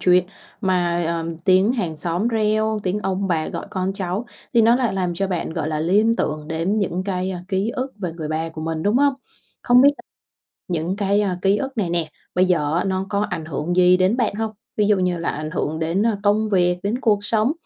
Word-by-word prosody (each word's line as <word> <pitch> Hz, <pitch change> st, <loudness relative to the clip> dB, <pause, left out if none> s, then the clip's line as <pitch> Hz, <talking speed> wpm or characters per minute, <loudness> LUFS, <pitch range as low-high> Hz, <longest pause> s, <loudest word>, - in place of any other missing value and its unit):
chuyện 180 Hz, 0 st, +4 dB, 0.4 s
mà, 175 Hz, -3 st, +1 dB
ờm, 165 Hz, -1 st, -3 dB
tiếng 185 Hz, +5 st, +3 dB
hàng 175 Hz, -11 st, -2 dB
xóm 175 Hz, +8 st, -1 dB
reo, 215 Hz, -1 st, +1 dB
tiếng 185 Hz, +3 st, -1 dB
ông 195 Hz, 0 st, -1 dB
bà 160 Hz, -3 st, 0 dB
gọi -, -, -5 dB
con 185 Hz, 0 st, -1 dB
cháu 195 Hz, +4 st, -3 dB, 0.3 s
thì 230 Hz, -, +6 dB
nó 230 Hz, +2 st, +5 dB
lại 245 Hz, -5 st, 0 dB
làm 180 Hz, -2 st, -1 dB
cho 195 Hz, +3 st, -1 dB
bạn, 175 Hz, -3 st, -3 dB
gọi 160 Hz, -3 st, -2 dB
là, 155 Hz, -1 st, -2 dB
liên 210 Hz, +7 st, +3 dB
tưởng 150 Hz, 0 st, -2 dB
đến 170 Hz, +7 st, 0 dB
những 185 Hz, -2 st, -1 dB
cái, 185 Hz, -1 st, -2 dB
ờ, 180 Hz, -2 st, -5 dB
ký 195 Hz, +4 st, 0 dB
ức 260 Hz, 0 st, -4 dB
về 180 Hz, -4 st, -3 dB
người 160 Hz, -2 st, -6 dB
bà 160 Hz, +1 st, -2 dB
của 160 Hz, -1 st, -8 dB
mình, 160 Hz, 0 st, -3 dB
đúng 210 Hz, +4 st, +2 dB
không? 280 Hz, 0 st, +3 dB, 0.5 s
Không 245 Hz, 0 st, +5 dB
biết 285 Hz, -, +7 dB
l -, -, -12 dB, 0.7 s
những 170 Hz, +3 st, -1 dB
cái, 200 Hz, 0 st, +1 dB
à, 185 Hz, -3 st, -1 dB
ký 195 Hz, +1 st, +3 dB
ức 265 Hz, +2 st, -4 dB
này 180 Hz, -5 st, 0 dB
nè, 165 Hz, -3 st, -1 dB, 0.2 s
bây 180 Hz, -, +4 dB
giờ 155 Hz, -4 st, +1 dB
á -, -, 0 dB
nó 190 Hz, 0 st, -1 dB
có 200 Hz, -1 st, 0 dB
ảnh 165 Hz, -3 st, -3 dB
hưởng 155 Hz, +3 st, -3 dB
gì 180 Hz, 0 st, +6 dB
đến 185 Hz, +6 st, +2 dB
bạn 230 Hz, -5 st, 0 dB
hông? 220 Hz, 0 st, -2 dB, 0.2 s
Ví 210 Hz, -1 st, +2 dB
dụ 210 Hz, -1 st, +4 dB
như 180 Hz, -2 st, 0 dB
là 165 Hz, -, -3 dB
ảnh 155 Hz, +1 st, -5 dB
hưởng 155 Hz, +1 st, -2 dB
đến, 165 Hz, +5 st, 0 dB
ờ, 220 Hz, -3 st, +1 dB
công 215 Hz, +1 st, +2 dB
việc, 180 Hz, -3 st, +2 dB
đến 220 Hz, +6 st, -1 dB
cuộc 215 Hz, -6 st, +3 dB
sống, 220 Hz, +5 st, +2 dB
185 Hz, 240 wpm, -21 LUFS, 170-210 Hz, 0.7 s, biết